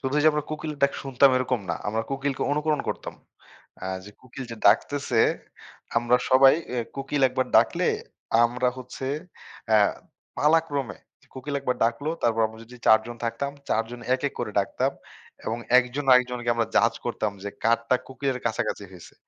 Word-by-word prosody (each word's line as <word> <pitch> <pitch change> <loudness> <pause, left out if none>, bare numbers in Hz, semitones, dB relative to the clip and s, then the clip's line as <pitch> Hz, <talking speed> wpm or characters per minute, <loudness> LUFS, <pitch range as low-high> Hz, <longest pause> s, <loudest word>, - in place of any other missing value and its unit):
শুধু 135 +2 -1
যে - - +4
আমরা 150 -1 -1
কোকিলের 155 -1 -5
ডাক 140 - +4
শুনতাম 135 0 +4
এরকম 130 -2 0
না। - - 0
আমরা 110 +2 -1
কোকিলকে 135 0 -2
অনুকরণ 150 0 0
করতাম। - - -4 0.7
আ - - -3 0.2
যে 105 - -11
কোকিল 130 +1 -9
যে - - -7
ডাকতেছে 140 -5 +3 0.8
আমরা 120 +1 +3
সবাই 135 +1 +7 0.2
ইয়ে 125 - 0 0.2
কোকিল 140 +1 -2
একবার 130 0 -1
ডাকলে - - +3 0.6
আমরা 125 +2 +1
হচ্ছে 130 +1 -7 0.6
অ্যা 110 -1 +5 0.6
পালাক্রমে 150 -6 +1 0.4
কোকিল 135 +2 -5
একবার 125 -2 -1
ডাকলো 120 +7 -1
তারপর 115 -1 +2
আমরা 110 0 -13
যদি 125 +2 -14
৪ 110 0 +7
জন 120 - -7
থাকতাম, 140 +4 -2 0.2
৪ 110 - +2
জন 120 0 -8
এক 130 - -3
এক - - -19
করে 120 -3 -3
ডাকতাম 100 - -1 0.5
এবং 115 +1 -1 0.2
একজন 130 +3 -1
আর 130 - +10
একজনকে 125 -1 -3
আমরা 115 -1 0
জাজ 115 0 +4
করতাম 110 -3 -1
যে 100 - -3
কারটা 115 +2 +3
কোকিলের 130 -1 -3
কাছাকাছি 100 - -2
হইছে 90 -3 -13
125 Hz, 170 wpm, -25 LUFS, 115-140 Hz, 0.8 s, আর